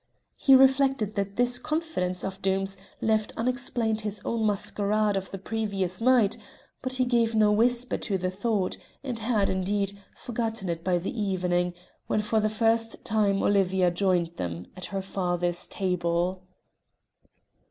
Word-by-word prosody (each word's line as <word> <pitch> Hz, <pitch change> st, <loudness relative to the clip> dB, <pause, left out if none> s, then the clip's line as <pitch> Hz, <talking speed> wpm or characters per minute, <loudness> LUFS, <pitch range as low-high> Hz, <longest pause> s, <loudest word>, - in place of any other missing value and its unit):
He 270 Hz, -, +6 dB
reflected 265 Hz, -5 st, +4 dB
that 200 Hz, -1 st, -2 dB
this 245 Hz, +1 st, +2 dB
confidence 305 Hz, -, -2 dB
of 195 Hz, 0 st, -5 dB
Doom's 195 Hz, 0 st, 0 dB, 0.3 s
left 220 Hz, -1 st, +1 dB
unexplained 235 Hz, -2 st, 0 dB
his 210 Hz, -1 st, -2 dB
own 225 Hz, -2 st, 0 dB
masquerade 205 Hz, +1 st, +1 dB
of 190 Hz, -1 st, -3 dB
the 195 Hz, -, -6 dB
previous 195 Hz, -2 st, -2 dB
night, 235 Hz, -4 st, +4 dB, 0.4 s
but 255 Hz, 0 st, -2 dB
he 255 Hz, 0 st, +2 dB
gave 235 Hz, -2 st, +2 dB
no 215 Hz, -1 st, +4 dB
whisper 240 Hz, +3 st, +2 dB
to 200 Hz, -3 st, -1 dB
the 185 Hz, 0 st, -2 dB
thought, 200 Hz, -1 st, -1 dB, 0.3 s
and 250 Hz, -4 st, -3 dB
had, 215 Hz, -3 st, +1 dB
indeed, 195 Hz, +1 st, -1 dB, 0.2 s
forgotten 225 Hz, -5 st, -3 dB
it 165 Hz, -1 st, -3 dB
by 180 Hz, -1 st, +2 dB
evening, 180 Hz, -2 st, -1 dB, 0.3 s
when 210 Hz, -, 0 dB
for 220 Hz, +1 st, +1 dB
the 215 Hz, 0 st, +1 dB
first 225 Hz, +1 st, 0 dB
time 205 Hz, -3 st, +2 dB
Olivia 190 Hz, -2 st, +3 dB
joined 175 Hz, -2 st, 0 dB
them 85 Hz, 0 st, -4 dB
at 185 Hz, -, -5 dB
her 195 Hz, 0 st, -4 dB
father's 175 Hz, -2 st, -1 dB
table. 180 Hz, -1 st, -1 dB
205 Hz, 145 wpm, -27 LUFS, 185-225 Hz, 0.4 s, He